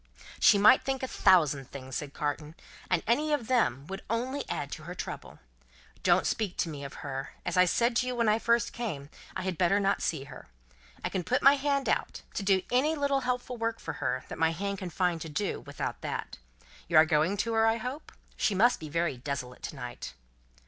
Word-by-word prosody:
"She 205 - +7
might 215 +6 +7
think 265 -1 -2
a - - 0
thousand 150 - +3
things," 130 0 -5
Carton 150 +1 -3
said, - - -22 0.3
"and 180 -3 +1
any 295 +7 +2
of 280 -6 0
them 145 - +1
would 195 +4 -6
only 255 +5 -1
add - - -3
to - - -6
her - - -6
trouble. - - -7 0.6
Don't - - +3
speak 205 -5 -1
of 165 - -2
me 145 -2 -7
to 140 - -5
her. 135 0 -5
As 180 - -1
I 180 0 +6
said 235 +6 +2
to 250 - +1
you 250 - -2
when 235 -2 +1
I 215 +1 +3
first 235 -1 +2
came, 165 -12 -5 0.2
I - - -3
had 185 -3 -3
better 185 +3 +3
not 200 0 +1
see 150 -5 -1
her. 140 -2 -12 0.6
I - - 0
can 185 - -2
put 255 - 0
my 275 - +9
hand 280 -1 0
out, - - -1
to - - -2
do 195 -1 +2
any 285 +6 +3
little 280 -2 +1
helpful 250 -1 -2
work 230 0 -2
for - - -5
her 130 - -1
that - - -8
my 160 0 +4
hand 200 +3 -3
can 185 - -5
find 175 -1 0
to 160 - -6
do, 195 +7 -2
without - - -5
that. - - -5 0.5
You 165 - +3
are 155 - +9
going 155 +6 +2
to 230 +3 -1
her, 225 0 +4
I 225 +1 +3
hope? 250 +6 -6 0.2
She 205 - +1
must 240 +6 +4
be 155 - -7
very 165 -3 0
desolate 130 -1 -5
to - - -6
night." 125 - -7
195 Hz, 220 wpm, -29 LUFS, 155-240 Hz, 0.6 s, my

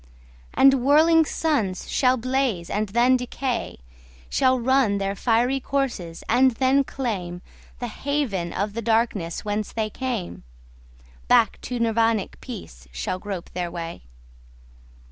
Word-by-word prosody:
And 270 -2 +5
whirling 320 +4 +5
suns 245 - -1
shall 255 -1 +2
blaze 255 -8 -1
and 210 0 -1
then 240 +5 +4
decay, 250 0 -3 0.5
Shall 255 0 +3
run 250 -4 +2
their 195 0 -1
fiery 245 +5 +1
courses 250 -12 -3
and 260 +3 +5
then 265 +3 +3
claimThe 190 -11 -4 0.4
haven 245 -7 -2
of 200 +3 -2
the 230 - -3
darkness 220 -7 0
whence 210 0 -2
they 215 -1 -2
came; 235 - -4 0.9
Back - - +3
to 250 -1 -4
Nirvanic 225 -2 +1
peace 60 - -9
shall 60 - -3
grope 195 -3 -6
their 175 -1 -3
way. 170 -1 -6
230 Hz, 125 wpm, -24 LUFS, 195-260 Hz, 0.9 s, And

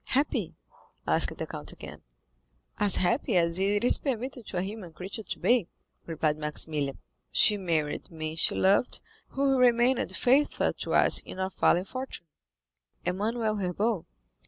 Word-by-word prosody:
"Happy?" 260 - 0 0.5
asked - - +2
the - - -4
count - - -6
again. - - -11 0.8
"As 205 -2 +3
happy 230 +3 +1
as 170 +1 +3
it 205 +2 +1
is 245 - +6
permitted 250 -3 -4
to 185 - -4
a 175 - 0
human 195 -4 -8
creature 190 +6 -5
to - - -5
be," 240 -7 +2 0.4
replied 155 -2 -1
Maximilian. 150 -2 0 0.3
"She 210 - +7
married 165 -6 -2
the 165 - -16
man 155 0 -5
she 160 - +2
loved, 200 +5 +2 0.3
who 270 -1 0
remained 245 +1 +2
faithful 275 +4 +2
to - - -4
us - - +5
in - - -10
our 190 0 -2
fallen 180 0 +2
fortunes—Emmanuel 185 - -6
Herbaut." 195 0 -2
195 Hz, 145 wpm, -27 LUFS, 165-240 Hz, 0.8 s, She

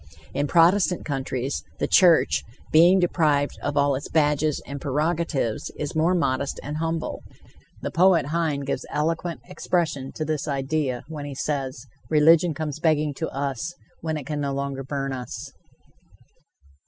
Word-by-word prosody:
In 145 +2 0
Protestant 180 +3 +3
countries, 135 -2 -3
the - - 0
church, 175 -4 +5 0.3
being 170 +4 +7
deprived 155 -5 +1
of 145 0 -2
all 140 0 +3
its 135 +2 -4
badges 150 -1 +2
and 140 +1 -7
prerogatives, 150 -4 -1
is 150 0 -4
more 165 +4 +3
modest 140 -4 0
and 150 +2 -4
humble. 165 0 -2 0.6
The - - -2
poet 175 -3 +4
Heine 160 -4 0
gives 140 0 -3
eloquent 160 -1 -2
expression 150 -7 -1
to 155 - -3
this 155 -2 -2
idea 140 -2 -1
when 150 -2 -6
he 140 -1 -6
says: 135 -3 -3 0.2
"Religion 160 +1 +5
comes 150 0 -4
begging 155 -2 +2
to 160 - -2
us, 140 +4 -3 0.2
when 160 -1 -2
it 145 - -7
can 150 -1 -3
no 140 -1 -1
longer 140 -1 -3
burn 135 0 -3
us." 125 -1 -6
150 Hz, 150 wpm, -24 LUFS, 140-165 Hz, 0.6 s, being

